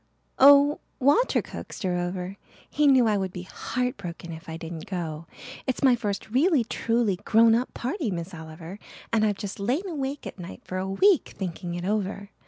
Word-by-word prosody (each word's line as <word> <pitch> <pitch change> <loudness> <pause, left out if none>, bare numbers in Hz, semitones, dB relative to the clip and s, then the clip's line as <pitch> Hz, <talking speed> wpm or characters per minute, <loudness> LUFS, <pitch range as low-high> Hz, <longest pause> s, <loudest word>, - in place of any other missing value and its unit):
"Oh, 285 +2 +7 0.2
Walter 290 - +3
coaxed - - -8
her 180 -1 0
over. 180 +2 -3 0.3
He 300 0 +2
knew 260 -3 +6
I 215 -2 +2
would 190 -1 -2
be 180 0 -7
heart 250 +6 -3
broken 175 -3 -7
if 160 +1 -10
I 160 - -5
didn't 165 -1 -7
go. 165 -4 -4 0.4
It's 260 +2 -1
my 260 -2 +6
first 210 -2 -4
really 285 - +3
truly 230 -3 0
grown 225 +4 +4
up 240 +3 0
party, 260 - -2
Miss 175 0 -4
Oliver, 160 +3 -9 0.3
and 220 -1 +3
I've 205 -2 +1
just 205 -2 -6
lain 260 - -1
awake 285 -4 -4
at - - -8
nights 180 +1 -9
for 185 - -4
a 190 +1 -3
week 370 - +3
thinking 175 -2 -4
it 175 0 -4
over. 200 0 -2
205 Hz, 190 wpm, -26 LUFS, 180-255 Hz, 0.4 s, Oh